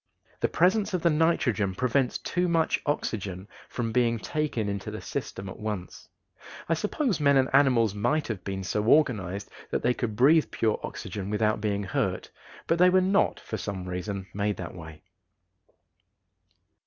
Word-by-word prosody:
The - - +2
presence 200 +4 +2
of 175 - -2
the 170 - +4
nitrogen 130 - +1
prevents 125 +2 +1
too 180 +1 -1
much 165 -2 +1
oxygen 100 -9 -2 0.2
from 115 -2 -3
being 115 0 +2
taken 135 -3 -2
into 100 -1 -3
the - - -6
system 95 - -5
at 95 - -8
once. 105 -5 -6 0.6
I 165 - +2
suppose 210 - -1
men 140 -2 +4
and 130 -1 +3
animals 125 -7 +4
might 145 +9 0
have 105 -6 -4
been 95 -1 -4
so 105 +2 -1
organized 105 - +2 0.2
that - - -2
they 125 - +3
could 115 -4 -3
breathe 150 +7 +5
pure 110 -2 0
oxygen 100 -2 -6
without 105 0 +1
being 100 -1 -1
hurt, 95 - -2 0.3
but 165 - +1
they 180 +1 +7
were 185 +1 +5
not, 190 +2 +2
for 110 - -5
some 95 -2 -5
reason, 95 +2 -4
made 100 0 -1
that 85 - -6
way. 80 -3 -11
115 Hz, 165 wpm, -27 LUFS, 100-155 Hz, 0.6 s, they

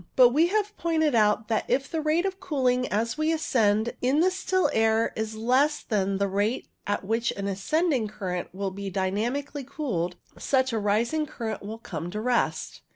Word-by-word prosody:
But 250 -2 +8
we 310 +7 +3
have 420 +2 -1
pointed 315 -3 +1
out 215 -1 +3
that 220 - +1
if 270 +1 +1
the 325 -2 -2
rate 310 +4 +1
of 385 0 -3
cooling 255 -8 +1
as 230 +7 -1
we 310 +1 +2
ascend 225 -8 +1
in 260 +4 +2
the 365 +3 +4
still 370 0 +1
air 220 0 +2
is 220 0 -3
less 255 +7 +2
than 195 -3 0
the 200 0 +1
rate 205 +5 -1 0.2
at 205 -1 -1
which 225 +3 0
an 200 0 -4
ascending 255 - 0
current 180 -4 -4
will 195 +1 -3
be 200 +1 -5
dynamically 225 +10 -2
cooled, 240 - -3 0.2
such 260 -2 +1
a 225 - +1
rising 230 +9 +1
current 220 -6 -5
will 215 +2 -6
come 175 -7 -6
to 210 +4 -4
rest. 240 +2 -1
230 Hz, 185 wpm, -26 LUFS, 205-300 Hz, 0.2 s, But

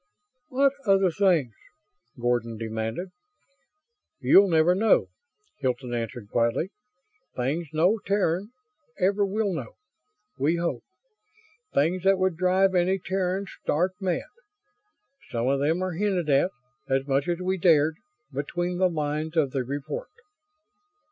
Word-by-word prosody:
"What 275 +1 +3
other 195 -2 +4
things?" 165 - +2 0.7
Gordon 120 -2 0
demanded. 110 - -4 1.1
"You'll 200 0 +6
never 165 +1 +4
know," 215 +4 +3 0.5
Hilton 125 -2 -2
answered, 115 -2 -4
quietly. 120 - +1 0.6
"Things 145 +7 -1
no 175 +8 +2
Terran 200 -1 +1 0.5
ever 200 +2 +2
will 200 0 0
know. - - -5 0.7
We 150 +5 +2
hope. 170 0 -2 0.9
Things 170 +6 +2
that 195 0 +4
would 185 -2 +1
drive 185 +2 +3
any 185 +1 +2
Terran 190 +1 -2 0.2
stark 175 +5 +1
mad. 180 -3 0 1.1
Some 120 +1 -1
of 135 +1 +2
them 160 +6 +1
are 185 - -2
hinted 180 -4 0
at 140 +6 +4 0.4
as 135 0 +1
much 140 +2 0
as 175 -1 0
we 185 +1 -1
dared 160 -3 +4 0.4
between 175 +6 -2
the 185 -1 +4
lines 155 0 -3
of 145 -4 +2
the 135 -1 -1
report." 145 - -5
170 Hz, 125 wpm, -26 LUFS, 140-190 Hz, 1.1 s, You'll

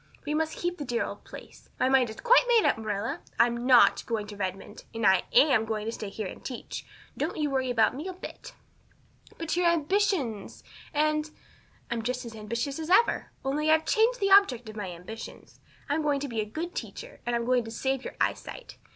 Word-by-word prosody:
We 295 - -1
must 315 +1 0
keep 350 0 -2
the - - -3
dear 240 -3 -1
old - - -8
place. - - -12
My - - +3
mind 260 -3 +4
is 220 - -9
quite - - +5
made 470 -3 +5
up, - - +3
Marilla. 220 +7 -3 0.2
I'm 235 +1 +2
not 250 -2 +6
going 225 -3 -1
to 210 0 -9
Redmond; 190 -1 -5
and 225 -1 -1
I 190 -2 +5
am 265 -7 +5
going 215 -1 -3
to 225 - -2
stay 215 -3 -6
here 210 +1 -5
and - - -8
teach. 250 -3 -6 0.3
Don't - - -2
you 300 -2 0
worry 260 -1 0
about 225 -1 +3
me 305 +7 -5
a 375 - -4
bit." 365 - -10 0.8
"But 330 -1 -2
your 355 0 +3
ambitions 335 - 0 0.3
and 305 +1 +1 0.3
" - - -26
"I'm 235 -1 -1
just 250 +2 -3
as 230 -1 -8
ambitious 235 +7 -3
as 320 +1 -5
ever. 390 +6 +3 0.2
Only, 300 +3 0
I've 315 0 +4
changed 475 +2 +3
the 395 -2 +1
object 265 - +5
of 215 - -9
my 205 -3 -4
ambitions. 180 +6 -10 0.3
I'm 295 +2 0
going 295 -2 +1
to 285 - -2
be 230 -4 -2
a - - -3
good 325 +11 -5
teacher - - -7
and 240 - -1
I'm 235 0 -1
going 250 0 +2
to - - -7
save 265 +3 -2
your - - -7
eyesight. - - -3
265 Hz, 215 wpm, -28 LUFS, 225-315 Hz, 0.8 s, not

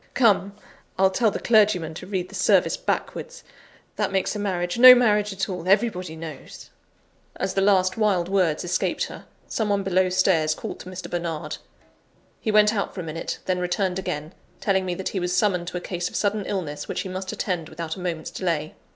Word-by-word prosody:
Come! 200 -5 +3 0.4
I'll 190 0 +4
tell 220 +3 +2
the - - -3
clergyman 205 -8 +3
to 180 +3 -9
read 185 -2 -3
the - - -14
service - - +3
backwards; - - -4 0.5
that - - 0
makes 190 +2 0
a - - -3
marriage 180 0 -2
no 255 0 +11
marriage 210 -4 +2
at 195 0 -2
all, 180 -2 -5
everybody 190 -5 +1
knows." 160 -3 -10 0.6
As 190 - -2
the 195 - +1
last 185 -1 +3
wild 200 -6 +2
words 185 -5 +1
escaped 175 0 0
her, - - -7 0.2
some 220 -2 -1
one 200 -1 +1
below 185 -1 +2
stairs 180 -4 +2
called - - -7
to 180 - -9
Mr. 185 0 -7
Bernard. 170 -3 -4 0.8
He 220 - -3
went 210 0 +5
out 200 -2 -2
for 185 - -4
a - - -6
minute, 165 0 -4
then 185 -1 0
returned 180 +1 -1
again, 155 -2 -4 0.3
telling 190 -2 +1
me 180 - -1
that 190 - -3
he 195 - -3
was 180 0 -1
summoned 180 -5 +1
to 180 - -4
a - - -5
case 175 -1 -3
of - - -12
sudden 205 -1 0
illness 150 -7 -4
which - - -2
he - - -6
must 185 +1 -4
attend 175 -5 -3
without 165 -1 -5
a - - -10
moment's 170 -3 -4
delay. 165 -4 -2
185 Hz, 205 wpm, -24 LUFS, 175-200 Hz, 0.8 s, no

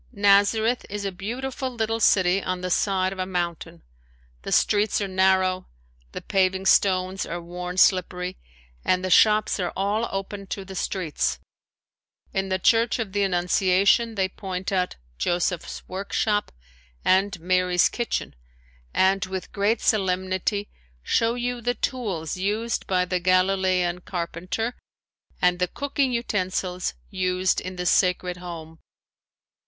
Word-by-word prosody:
Nazareth 205 +3 +3
is 205 0 -4
a 195 - -1
beautiful 255 +8 -4
little 225 -2 -2
city 190 -3 +4
on 185 0 -3
the 180 0 -3
side 190 0 +1
of 190 - -11
a 185 - 0
mountain. 170 - -4 0.6
The - - -6
streets 210 +1 +3
are 200 - -1
narrow, 185 -1 +2 0.4
the - - -7
paving 190 0 +1
stones 185 -1 +3
are 175 - -4
worn 180 +1 -6
slippery, 185 -1 +2 0.4
and 185 0 +1
the 185 - -2
shops 215 +1 +4
are 180 -2 -1
all 205 +4 0
open 195 0 -5
to 195 0 -5
the 190 - -9
streets. 180 -4 -1 1.0
In 195 0 -1
the 185 - +1
Church 225 +4 +3
of 225 -5 -3
the 205 - +1
Annunciation 190 +4 +2
they 190 -2 +1
point 190 -1 -5
out 185 -2 0 0.2
"Joseph's 175 -1 -2
Workshop" 205 +2 -1 0.5
and 190 0 +2
"Mary's 180 +1 +3
Kitchen" 240 -1 -3 0.6
and 190 +1 +3
with 185 -1 -6
great 210 +3 +1
solemnity 190 +1 0 0.3
show 230 - +1
you 245 0 -3
the 245 +1 0
tools 195 - -3
used 210 +5 -2
by 180 -1 +2
the 180 0 -1
Galilean 185 -1 +2
carpenter 180 +7 -3 0.6
and 180 0 +2
the 180 - +2
cooking 280 +3 -1
utensils 185 -6 -2 0.2
used 185 -1 0
in 185 0 -6
the 180 0 -4
sacred 180 0 +2
home. 165 -2 -9
190 Hz, 135 wpm, -24 LUFS, 180-205 Hz, 1.0 s, city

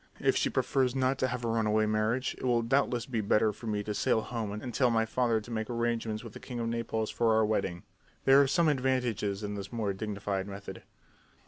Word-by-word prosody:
"If - - +2
she - - +2
prefers 130 -2 +1
not 130 0 +1
to 130 - +2
have 125 -1 -3
a - - 0
run 115 -1 +1
away 110 0 +3
marriage 110 +4 0
it - - -9
will 120 -2 +2
doubtless 125 -1 +1
be 115 -4 -2
better 105 +1 +2
for 115 - -9
me 105 -1 -1
to 105 - -3
sail 110 +2 +2
home 110 -3 -4
and 110 +4 -5
tell 125 +1 +3
my 115 -1 +2
father 115 0 +1
to 110 +3 -11
make 110 -1 -3
arrangements 115 -2 -1
with 115 -3 -9
the - - -9
king 125 -2 -6
of 115 - -1
Naples 115 -1 -2
for 115 -2 +2
our 110 0 +4
wedding. 95 -5 -1 0.4
There 135 +1 +7
are 140 - +3
some 170 +4 +3
advantages 125 -7 0
in 105 0 -3
this 100 -1 -6
more 110 -4 -1
dignified 100 -1 -3
method." 100 0 -8
115 Hz, 230 wpm, -30 LUFS, 105-125 Hz, 0.4 s, There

